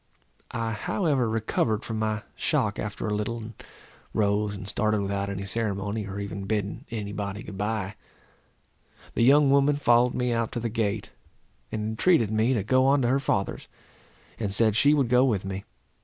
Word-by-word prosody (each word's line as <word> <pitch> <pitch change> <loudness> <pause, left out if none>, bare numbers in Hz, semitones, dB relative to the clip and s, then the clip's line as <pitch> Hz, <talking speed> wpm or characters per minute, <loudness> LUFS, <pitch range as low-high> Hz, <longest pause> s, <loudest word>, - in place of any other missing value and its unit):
I 115 -1 -2
however 135 - 0
recovered 110 0 0
from 110 -1 -3
my 110 0 -1
shock - - 0
after - - -4
a 105 - -1
little, 105 +3 -2
and 115 0 -8 0.6
rose 105 0 +1
and 95 -1 -8
started 110 0 +1
without 100 0 -2
any 100 0 -4
ceremony, 100 0 -2
or 100 +1 -5
even 100 -1 -5
bidding 105 -1 -2
any 105 -4 -4
body 100 0 -4
good 100 - -8
bye. 105 0 -2 1.2
The - - 0
young 140 +3 +6
woman 140 +1 +4
followed 125 -2 +3
me 125 -1 0
out 115 -1 -1
to - - -2
the 115 0 -2
gate, 105 -3 -2 0.6
and 105 - -2
entreated 115 - +3
me 110 +4 +2
to 105 - 0
go 130 +5 +3
on 140 -1 +4
to 120 - +2
her 135 +2 +3
father's, 100 -8 -1 0.7
and 105 -3 -1
said 110 +1 +3
she 145 +6 +5
would 140 -4 +2
go 125 +1 +4
with 105 -8 +1
me. 95 0 -5
110 Hz, 180 wpm, -26 LUFS, 100-120 Hz, 1.2 s, young